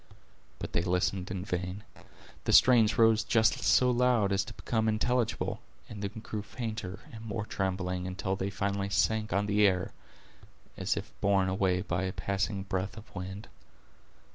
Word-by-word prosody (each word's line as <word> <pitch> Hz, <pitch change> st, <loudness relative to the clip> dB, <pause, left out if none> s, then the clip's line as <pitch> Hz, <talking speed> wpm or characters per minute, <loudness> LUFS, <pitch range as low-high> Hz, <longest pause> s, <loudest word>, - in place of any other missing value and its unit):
But -, -, -7 dB
they -, -, +2 dB
listened 90 Hz, +1 st, 0 dB
in 95 Hz, -1 st, -4 dB
vain. 90 Hz, +1 st, -3 dB, 0.6 s
The -, -, +1 dB
strains 115 Hz, -4 st, +6 dB
rose 110 Hz, -1 st, +5 dB
just 110 Hz, -1 st, +3 dB
so 125 Hz, -1 st, +4 dB
loud 120 Hz, -4 st, +3 dB
as 100 Hz, 0 st, +2 dB
to -, -, -9 dB
become 110 Hz, -2 st, -1 dB
intelligible, 115 Hz, +1 st, 0 dB, 0.3 s
and 105 Hz, -2 st, -8 dB
then 105 Hz, +2 st, -5 dB
grew 105 Hz, -1 st, -4 dB
fainter 110 Hz, -4 st, -5 dB
and 110 Hz, 0 st, -9 dB
more 110 Hz, -1 st, -3 dB
trembling, 95 Hz, -2 st, -2 dB
until 95 Hz, +1 st, -2 dB
they 95 Hz, +1 st, -2 dB
finally 100 Hz, 0 st, -2 dB
sank 110 Hz, +2 st, +1 dB
on 100 Hz, +3 st, +1 dB
the 105 Hz, 0 st, 0 dB
ear, 95 Hz, -3 st, +3 dB, 0.8 s
as -, -, -1 dB
if -, -, -6 dB
borne 95 Hz, -1 st, +3 dB
away 95 Hz, -1 st, +1 dB
by 85 Hz, +1 st, -1 dB
a 95 Hz, -, -3 dB
passing 100 Hz, 0 st, -2 dB
breath 95 Hz, +1 st, -3 dB
of 110 Hz, -, -12 dB
wind. 95 Hz, +2 st, -6 dB
100 Hz, 165 wpm, -30 LUFS, 95-110 Hz, 0.8 s, strains